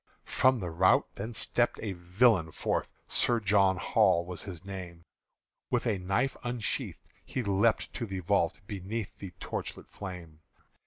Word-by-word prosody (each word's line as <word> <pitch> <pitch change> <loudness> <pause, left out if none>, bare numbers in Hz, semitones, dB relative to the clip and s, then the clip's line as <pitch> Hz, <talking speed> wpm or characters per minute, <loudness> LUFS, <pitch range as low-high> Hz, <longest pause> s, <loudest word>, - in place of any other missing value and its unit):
From 130 -1 +3
the 90 -4 -4
rout 90 +3 +3
then 110 +3 -6
stepped 120 +2 +1
a 105 - -2
villain 90 0 +3
forth - - -1 0.2
Sir 120 -1 +2
John 100 -2 +4
Hall 85 0 +3
was 90 -2 -4
his 90 -2 -7
name: 90 -4 -7 0.7
With - - +1
a 105 -5 +1
knife 100 +9 0
unsheathed 120 -3 -3 0.2
he 130 - -3
leapt 100 +2 +2
to 115 - -3
the 95 -2 -4
vault 90 -1 +1
Beneath 100 +2 -4
the 100 - -6
torchlight - - -5
flame. 90 -5 -8
95 Hz, 150 wpm, -30 LUFS, 90-110 Hz, 0.7 s, John